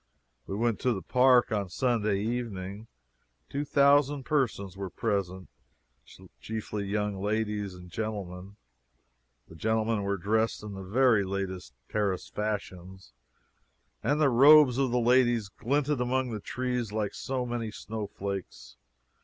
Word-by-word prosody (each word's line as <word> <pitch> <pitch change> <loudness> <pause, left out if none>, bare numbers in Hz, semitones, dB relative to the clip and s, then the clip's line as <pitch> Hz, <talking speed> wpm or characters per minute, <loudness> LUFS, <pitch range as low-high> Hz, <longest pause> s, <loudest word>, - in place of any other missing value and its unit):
We 95 - -4
went 115 +1 0
to 125 - +1
the 95 - -5
park 125 -1 +4
on 100 -3 -1
Sunday 110 -2 0
evening. 110 -3 -4 0.6
Two 140 +1 -2
thousand 140 -1 +3
persons 115 -10 -1
were 95 -1 -5
present, 95 -4 -2 0.9
chiefly 105 -2 -4
young 105 -1 -2
ladies 105 -2 -1
and 90 0 -12
gentlemen. 100 -2 -5 0.9
The - - -14
gentlemen 110 +3 0
were 100 0 -1
dressed 110 +4 0
in 105 -1 -7
the 95 - -7
very 110 +2 +3
latest 95 -7 -4
Paris 100 -4 -1
fashions, 95 - -5 0.9
and 145 +1 +1
the 150 -3 +4
robes 140 +1 +7
of 135 -2 +2
the 125 +1 +1
ladies 120 -3 +3
glinted 140 +5 -1
among 125 0 0
the 110 - -4
trees 125 0 -3
like 105 -2 -2
so 130 -2 -3
many 120 -2 -3
snowflakes. 100 -3 -6
110 Hz, 130 wpm, -29 LUFS, 100-125 Hz, 0.9 s, robes